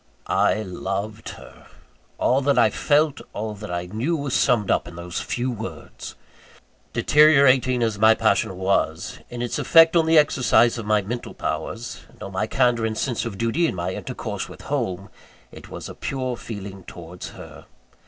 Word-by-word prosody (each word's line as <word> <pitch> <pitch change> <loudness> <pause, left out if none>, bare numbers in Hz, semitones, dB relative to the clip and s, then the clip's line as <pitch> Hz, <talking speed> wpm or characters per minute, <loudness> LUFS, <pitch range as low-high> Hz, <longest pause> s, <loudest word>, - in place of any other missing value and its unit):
I 110 - +1
loved 100 +3 -5
her! - - -15 0.5
All 130 +2 +2
that 140 +1 +2
I 110 -2 +5
felt, 150 +3 +1
all 110 0 -4
that 105 0 -9
I 85 0 -3
knew, 115 - -2
was 140 -3 -4
summed 115 -6 +2
up - - +1
in 85 - -10
those 85 +1 -5
few 125 +1 -2
words! 100 -9 -8 0.8
Deteriorating 135 -5 +4
as 110 -3 -1
my 110 +1 +6
passion 100 -4 +1
was 95 -3 -1
in 120 0 -5
its 120 - -2
effect 165 +1 +6
on 165 -1 +4
the 160 0 +5
exercise 125 -5 +4
of 110 - -6
my 105 -1 +2
mental 120 +5 -6
powers, 115 +1 -4
and - - -13
on 100 - -7
my 95 +3 -1
candour 120 -3 +2
and 110 0 -4
sense 125 -1 -1
of 110 -4 -5
duty 115 - +1
in - - -3
my 90 +1 -2
intercourse - - -5
with - - -12
home, 95 +1 -3 0.4
it - - -12
was - - -7
a - - -8
pure 130 -2 -3
feeling 100 -4 -8
towards 85 +1 -9
_her. - - -12
110 Hz, 175 wpm, -23 LUFS, 95-130 Hz, 0.8 s, my